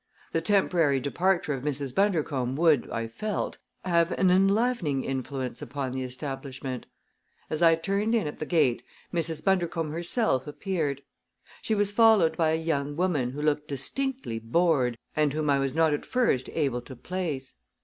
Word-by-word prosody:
The 165 - 0
temporary 170 -7 +2
departure 170 +3 0
of 135 -1 -5
Mrs. 140 -3 -2
Bundercombe 150 -10 0
would, 155 -5 +3
I 115 - -2
felt, 210 - -4 0.3
have 170 -1 +2
an 185 -2 +3
enlivening 195 - +2
influence 130 -2 -4
upon 135 +1 -4
the 130 0 -3
establishment. 130 0 -5 0.6
As 155 +1 -2
I 165 -1 +6
turned 200 +7 0
in 220 - +1
at 150 - -5
the 155 - -4
gate 150 -9 +2 0.3
Mrs. 165 -2 -1
Bundercombe 170 -5 +1
herself 170 - 0
appeared. 150 -4 -2 0.6
She 220 - 0
was 205 -1 +3
followed 215 -6 +5
by 160 -2 +2
a 160 - +2
young 145 -3 -1
woman 160 -8 0
who 145 +4 -5
looked 150 0 +1
distinctly 195 - -2
bored 125 0 +1 0.2
and 150 -2 +2
whom 150 -1 0
I 140 - +3
was 135 0 -1
not 160 -2 +3
at 145 - -2
first 235 - +1
able 135 -6 0
to 130 +2 -11
place. 155 -2 -4
155 Hz, 160 wpm, -27 LUFS, 135-180 Hz, 0.6 s, I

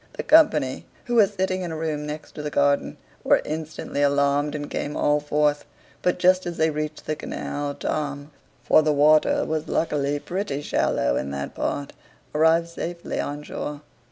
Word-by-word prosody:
The - - -5
company, 155 - +4 0.2
who 240 - -3
were 220 -4 +6
sitting 190 -1 -2
in 175 -2 -4
a 160 - -4
room 155 -2 -3
next 150 +1 -7
the 150 0 -4
garden, 140 0 +1 0.3
were - - +4
instantly 155 -2 -4
alarmed, 140 +1 +2
and 145 -1 -4
came 145 - -4
all 145 0 +2
forth; 150 0 +1 0.4
but 180 - +1
just 185 0 +3
as 170 - -4
they 160 0 +2
reached 150 0 -4
the 155 - -1
canal, 145 -1 -4
Tom 145 0 -3 0.3
(for 155 - +5
the 155 -1 +2
water 150 +2 +4
was 155 0 -2
luckily 145 -3 0
pretty 170 -3 -3
shallow 60 - +1
in 70 - -3
that 70 0 -5
part) 140 - -3 0.4
arrived 160 +2 +3
safely 170 +1 -5
on 145 +1 -3
shore. 150 0 -5
150 Hz, 170 wpm, -24 LUFS, 145-165 Hz, 0.4 s, were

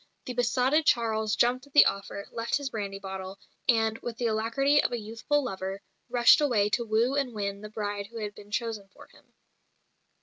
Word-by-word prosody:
The 250 - -4
besotted 250 +5 +2
Charles 220 -3 +2
jumped 250 +4 +1
at 285 - -23
the 290 - +8
offer; 200 0 -3
left 230 0 -2
his 285 -2 -5
brandy 200 -3 -4
bottle, 190 0 -7 0.3
and, 225 -1 +2
with 235 -2 -6
the 240 - -2
alacrity 230 +6 +2
of - - -1
a 240 - -1
youthful 225 +7 -1
lover, 195 -4 -5 0.3
rushed 240 +4 +6
away 225 -8 +2
to 235 - +1
woo 230 +3 +1
and 275 -4 -1
win 200 -1 -3
the 210 - -8
bride 205 -1 -4
who 230 +2 -11
had 210 -2 -4
been 205 0 -14
chosen 215 -3 -3
for - - -16
him. - - -24
225 Hz, 195 wpm, -28 LUFS, 205-245 Hz, 0.3 s, the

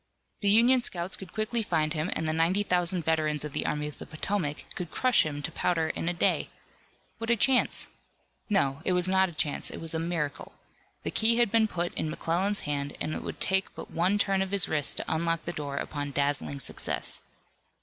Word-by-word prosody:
The 200 - +2
Union 240 +5 +6
scouts 180 -4 +1
could 190 - -11
quickly 220 +2 0
find 160 -7 0
him 155 +3 -1
and 160 - -2
the 155 - 0
ninety 170 +5 +2
thousand 180 -2 0
veterans 155 -2 +1
of 150 - -6
the - - -1
Army 150 0 -1
of 150 - -9
the - - -9
Potomac 155 -2 -3
could 175 -2 -5
crush 255 +9 +3
him 145 -1 -5
to - - -4
powder 165 -3 0
in 165 - -2
a - - +1
day. 170 - +1 0.7
What 225 0 -4
a 235 - +5
chance! 250 +3 +2 0.6
No, 140 -8 +1
it 185 - +1
was 180 0 +2
not 190 0 +3
a - - -9
chance. 155 -2 -1
It - - -7
was 165 -1 -5
a 160 - -1
miracle. 165 -4 -3 0.5
The - - -2
key 230 +1 +4
had 240 -4 +3
been 225 -1 +4
put 175 -3 -2
in 155 - -2
McClellan's 180 +6 0
hand 145 -1 -3
and 155 - -2
it - - -3
would - - -7
take 190 0 0
but - - -9
one 185 +5 +2
turn 195 -1 +1
of 190 - -1
his 195 -4 +1
wrist 150 -3 +2
to - - 0
unlock 165 +1 0
the 175 - -3
door 145 -3 -4
upon 145 -1 -3
dazzling 140 0 -1
success. - - +2
170 Hz, 215 wpm, -28 LUFS, 155-195 Hz, 0.7 s, Union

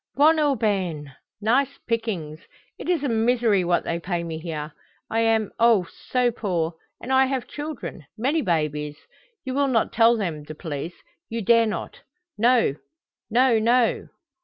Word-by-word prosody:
"Bon 310 +3 +5
aubaine. 195 - 0 0.3
Nice 265 +6 +1
pickings. 200 -10 -2 0.4
It - - -6
is 340 -5 +1
a - - +1
misery 230 -3 +2
what 175 0 +1
they 170 - -2
pay 175 -1 -2
me 165 -1 -5
here. 155 -2 -5 0.4
I 225 - +1
am, 225 -2 +2
oh, 230 -5 +5 0.2
so 250 -1 +2
poor, 175 -7 -2 0.3
and 260 - -3
I 265 0 +5
have 260 -2 -2
children, 290 - -7
many 275 +8 +1
babies. 150 - -1 0.5
You 260 - -3
will 280 +1 +2
not 235 -5 +1
tell 230 +1 +5
them 170 -8 -3
the 155 +1 -9
police 160 +1 -5 0.3
you 230 -1 -3
dare 230 +2 +5
not. 215 - -5 0.4
No, 230 - +3 0.5
no, 240 0 +4
no." 235 +2 +2
225 Hz, 155 wpm, -24 LUFS, 170-250 Hz, 0.5 s, Bon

